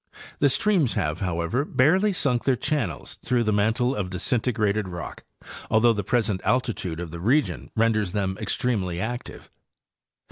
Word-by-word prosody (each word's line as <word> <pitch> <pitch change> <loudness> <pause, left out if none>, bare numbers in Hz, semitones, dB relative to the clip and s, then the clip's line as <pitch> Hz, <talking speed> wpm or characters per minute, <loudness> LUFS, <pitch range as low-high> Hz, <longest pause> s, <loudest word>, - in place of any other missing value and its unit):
The 145 - +4
streams: 180 - +2
have, 75 -1 -1
however, 90 +6 -1
barely 180 +9 +3
sunk 125 -10 +1
their 135 - +3
channels 120 - -3
through 125 -2 +1
the 110 -1 +1
mantle 115 +5 +1
of 95 -3 -3
disintegrated 110 +1 0
rock, 85 -3 -7 0.5
although 115 +1 +4
the 105 -2 -3
present 105 -3 0
altitude 105 -9 -1
of 85 -2 -6
the 85 - -7
region 95 - 0
renders 110 -4 +2
them 95 -1 -1
extremely 100 -6 -1
active. 120 +5 -6
110 Hz, 145 wpm, -25 LUFS, 95-125 Hz, 0.5 s, The